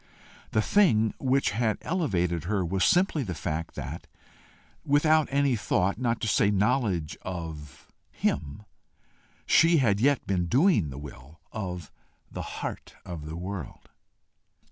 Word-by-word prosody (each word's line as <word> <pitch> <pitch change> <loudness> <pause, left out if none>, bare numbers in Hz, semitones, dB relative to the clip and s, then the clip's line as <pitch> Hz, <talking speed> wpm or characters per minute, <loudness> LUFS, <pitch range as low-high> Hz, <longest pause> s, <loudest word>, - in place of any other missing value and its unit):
The 110 - +1
thing 110 - +3
which 135 +1 +1
had 110 0 0
elevated 90 - -1
her 95 -1 0
was 90 +2 0
simply 180 -4 +3
the 95 -9 -4
fact 80 0 -4
that, - - -6 0.8
without 155 +1 +3
any 140 -2 +2
thought, 100 -1 0
not 120 -2 0
to 110 - -1
say 100 -1 +3
knowledge 100 - +1
of 80 -6 -7 0.2
him, 70 +8 -2 0.8
she 165 +1 +5
had 105 -8 +2
yet 140 +3 +2
been 90 -3 0
doing 130 - +3
the 65 - -8
will 75 +1 -11
of 90 -6 -5 0.4
the - - -5
Heart - - -6
of 80 -4 -7
the 80 - -6
world. 90 -1 -7
100 Hz, 135 wpm, -27 LUFS, 85-135 Hz, 0.8 s, she